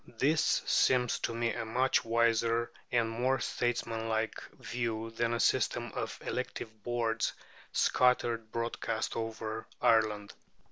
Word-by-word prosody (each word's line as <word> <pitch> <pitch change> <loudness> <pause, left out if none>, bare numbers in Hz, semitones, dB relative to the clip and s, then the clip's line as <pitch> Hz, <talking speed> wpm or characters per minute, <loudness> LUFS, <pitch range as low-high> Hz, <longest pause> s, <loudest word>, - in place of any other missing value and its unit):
This 150 +6 +2
seems 125 -2 +3
to - - -2
me 115 0 0
a - - -3
much 125 +4 +2
wiser 115 0 +2 0.2
and 120 -2 +2
more 125 +4 +1
statesmanlike 115 -2 -1 0.2
view 115 -2 -3
than 115 +1 0
a 120 - 0
system - - +1
of - - -4
elective 110 -2 -4
boards 115 0 0 0.4
scattered 120 -3 +2
broadcast 115 -1 -2
over 110 -1 -4
Ireland. 105 -2 +2
115 Hz, 120 wpm, -31 LUFS, 110-120 Hz, 0.4 s, seems